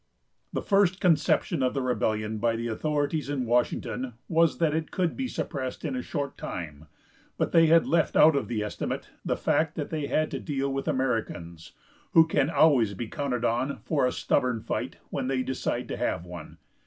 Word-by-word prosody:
The - - -3
first 195 -2 +3
conception 170 -2 +2
of 130 +1 +1
the 135 - 0
rebellion 110 -3 -1
by 115 +1 +1
the 115 +1 -3
authorities 150 +4 -1
in 135 -3 -1
Washington 120 +1 -1
was 165 0 +3
that 160 -3 +2
it 160 -1 -2
could 180 -3 -1
be 265 -1 -2
suppressed 135 - -4
in 140 -4 -2
a 125 - -2
short 140 0 -4
time; 75 -3 -6 0.5
but - - 0
they 165 -1 +6
had 165 +1 +5
left 165 -1 +1
out 155 0 +7
of 140 - 0
the 110 -3 -2
estimate 105 - -4
the - - -1
fact 160 -1 +1
that 150 - -4
they 155 -3 -2
had 155 +2 0
to - - -3
deal 140 -1 -2
with 135 0 -3
Americans, 110 -10 -2 0.4
who 165 -1 +8
can 150 -3 +1
always 130 -11 +4
be 115 +2 -5
counted 125 -5 -2
on 125 +5 0
for 140 -5 +1
a - - 0
stubborn 125 -2 0
fight - - -3 0.2
when - - -2
they 130 -1 0
decide 130 - -2
to - - -3
have 85 - -1
one. 85 -3 -9
135 Hz, 190 wpm, -27 LUFS, 115-155 Hz, 0.5 s, who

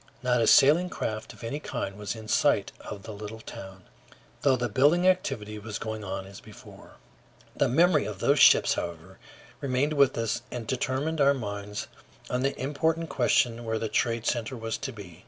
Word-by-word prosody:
Not 125 -1 +2
a 115 - +2
sailing 160 +6 +6
craft 110 -10 -4
of - - -15
any 140 +6 -3
kind 100 -9 -4
was 105 +1 -5
in 110 -1 -10
sight - - +2
of 100 -2 -8
the 110 - -8
little 105 +2 -8
town, 95 -3 -10 0.6
though 135 -2 +4
the 120 -1 -1
building 145 - +3
activity 115 - 0
was 105 +1 -6
going 110 -1 -5
on 95 -1 -5
as 100 +1 -11
before. 110 -2 -14 0.6
The - - +2
memory 170 +8 +3
of 105 -3 -5
those 140 +8 +2
ships, - - +6
however, 85 +2 -6 0.4
remained 140 +2 0
with 140 -3 +3
us 115 +1 -1
and 120 -2 -6
determined 135 +5 -1
our 140 0 +5
minds 105 -3 -5 0.5
on 125 - 0
the 135 +1 -1
important 160 +4 -1
question 120 -2 +1
where 110 -1 -2
the 110 0 -3
trade 115 +1 0
center 120 +1 -1
was 115 0 -3
to 135 - -4
be. 95 -7 -11
115 Hz, 185 wpm, -27 LUFS, 105-140 Hz, 0.6 s, sailing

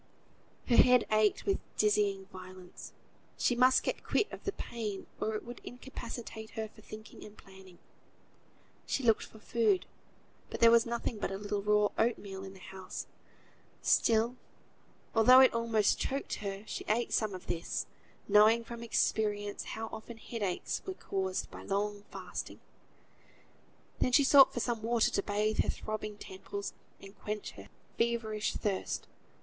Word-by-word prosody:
Her 240 - +4
head 250 -1 +6
ached 215 -1 +3
with 395 -1 +1 0.2
dizzying 205 -2 +2
violence; 185 -1 -10 0.5
she 245 - +2
must 255 +1 +5
get - - -2
quit 425 - +1
of - - -9
the 395 - 0
pain 215 - -5
or 220 0 -1
it 215 - -5
would 240 +1 -9
incapacitate 235 -3 -8
her 220 0 -2
for 215 - -18
thinking 215 0 -11
and 210 0 -12
planning. 190 -2 -15 1.1
She 270 - -1
looked 225 -3 +4
for - - -11
food, 210 -4 +1 0.6
but - - -5
there 230 0 +7
was 235 0 +5
nothing 235 -2 -3
but - - -1
a 195 - -4
little 205 0 -2
raw 210 0 +3
oatmeal 200 -4 -3
in 190 0 -8
the - - -13
house: 190 -1 -6 0.8
still, 230 +2 +3 0.8
although 245 +3 +8
it 260 -1 +7
almost 230 -3 +2
choked 275 +1 -2
her, 200 -1 -4
she - - -5
ate 235 +3 +1
some 215 -3 +1
of 185 - -9
this, 165 - -3 0.4
knowing 220 +3 +6
from 235 0 -8
experience, 210 -3 0
how 225 - -3
often 225 +1 -8
headaches 210 -5 -3
were 380 - -5
caused 190 - -3
by - - -9
long 205 +1 -2
fasting. - - -6 1.4
Then 250 - +1
she 285 - +7
sought 270 0 +8
for 240 - -3
some 235 -2 -1
water 230 0 +2
to - - +1
bathe 210 +2 -1
her - - +3
throbbing 215 -1 -4
temples, 200 +1 -6 0.3
and 195 +1 -13
quench 210 0 -4
her 100 0 -13 0.3
feverish 230 -2 0
thirst. 200 -3 -2
215 Hz, 155 wpm, -32 LUFS, 200-235 Hz, 1.4 s, although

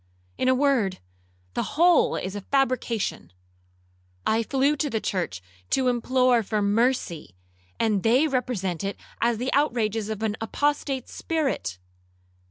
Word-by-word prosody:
In - - -1
a 260 - +5
word, 255 -8 +2 0.6
the - - -3
whole 345 +1 +5
is 185 +2 -4
a 205 - -4
fabrication. 245 - -1 0.9
I 220 +1 +2
flew 275 +5 +1
to 290 +1 0
the 225 - -1
church 175 - -3 0.3
to 260 -1 +2
implore 250 0 +3
for 215 0 -1
mercy, 205 - 0 0.4
and 215 -4 +2
they 250 +9 +4
represent 230 - -2
it 200 +1 -3 0.2
as 235 -1 +2
the 250 +4 -2
outrages 225 -7 +1
of 220 0 -4
an 220 -1 -1
apostate 275 +2 -1
spirit. 270 - -2
235 Hz, 135 wpm, -25 LUFS, 205-265 Hz, 0.9 s, a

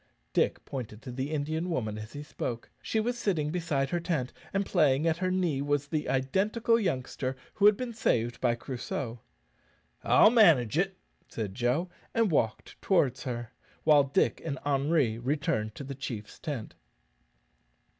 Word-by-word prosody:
Dick - - +1
pointed 120 -5 -6
to 130 - -6
the 130 +3 -3
Indian 155 +3 -2
woman 110 -10 -1
as 110 +1 -9
he 145 0 -6
spoke. 120 -5 -5
She 220 - -1
was 240 +2 -1
sitting 160 -9 0
beside 155 -6 -1
her 175 - +1
tent, 160 -7 -2 0.2
and 195 0 0
playing 150 -5 +3
at 165 -1 +2
her 185 +1 0
knee 175 -7 +1
was 145 0 0
the 150 +1 -2
identical 205 - +2
youngster 130 - -2 0.2
who 205 - +5
had 210 -1 +5
been 250 -2 -4
saved 120 - 0
by 120 -2 +3
Crusoe. 120 -1 -5 0.8
"I'll 215 - +6
manage 160 - +5
it," 190 +2 +1 0.3
said 105 -4 -4
Joe, 125 - 0 0.3
and 225 -4 +3
walked 115 -7 -1
towards 135 -10 +2
her, 120 -2 -4 0.3
while 150 -2 +6
Dick 135 - +1
and 145 -4 -3
Henri 140 -4 +2
returned 130 -4 -1
to - - -7
the 140 0 -5
chief's 120 -6 -6
tent. 140 -9 -5
145 Hz, 160 wpm, -29 LUFS, 125-175 Hz, 0.8 s, I'll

